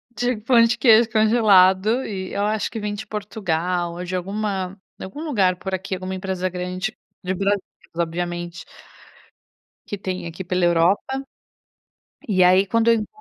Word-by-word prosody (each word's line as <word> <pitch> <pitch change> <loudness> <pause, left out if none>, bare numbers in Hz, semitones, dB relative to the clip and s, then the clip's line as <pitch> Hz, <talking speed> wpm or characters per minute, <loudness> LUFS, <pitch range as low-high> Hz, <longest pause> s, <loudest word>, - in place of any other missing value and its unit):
de 245 +1 0
pão 235 +2 +4
de 230 +1 +2
queijo 230 -2 +5
congelado. 215 0 +4
E 190 -3 -5
eu 200 - -1
acho 215 0 -1
que 225 - -6
vem 210 -1 -3
de 205 - -7
Portugal 180 -5 -2
ou 175 - -6
de 180 +1 -4
alguma 195 0 -3 0.2
de - - -6
algum 240 +11 -8
lugar 200 - +2
por 190 +1 -6
aqui, 190 0 -3
alguma 185 +1 -5
empresa 185 -1 -2
grande 180 +3 -4 0.3
de 185 +1 -1
Brasil 200 +1 0 0.4
obviamente 175 0 -3 1.2
que 205 - -5
tem 185 -2 -4
aqui 170 +3 -7
pela 180 0 0
Europa 185 +11 +2 1.0
e 185 -4 +3
aí 185 +2 +5
quando 230 +1 +2
eu 230 - +5
não 215 - -4
190 Hz, 165 wpm, -22 LUFS, 180-215 Hz, 1.2 s, queijo